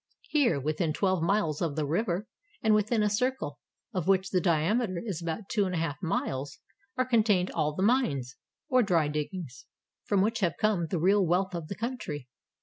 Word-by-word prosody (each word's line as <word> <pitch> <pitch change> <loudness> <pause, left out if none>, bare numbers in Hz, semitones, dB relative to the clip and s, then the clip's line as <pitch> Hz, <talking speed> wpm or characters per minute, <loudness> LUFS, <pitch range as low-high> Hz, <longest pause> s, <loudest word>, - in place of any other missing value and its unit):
Here, 265 - +3
within 155 +3 -1
twelve 185 0 +1
miles 170 -4 +1
of 160 -5 -1
the 155 -2 0
river, 180 +5 -1 0.4
and 220 -1 +4
within 215 +1 +2
a - - +3
circle, 210 - -1 0.3
of 180 -3 -2
which 190 0 +2
the 185 - +2
diameter 185 +4 +1
is 185 -6 -3
about 170 +5 -4
two 205 -2 +1
and 185 -1 -2
a - - 0
half 160 -2 -2
miles, 145 -3 -2 0.4
are 255 - +2
contained 215 -7 +2
all 150 -2 -1
the 185 - -1
mines, 150 - +1 0.2
— - - -62
or 255 -4 +4
dry 170 -8 +2
diggings, 150 -2 -5 0.2
— - - -63
from 200 -2 +3
which 225 +2 0
have 180 -5 0
come 205 -6 +1
the 180 - -1
real 195 +4 +4
wealth 185 +2 +1
of 170 -3 -4
the 200 - -5
country. 200 - -4
185 Hz, 200 wpm, -29 LUFS, 155-210 Hz, 0.4 s, and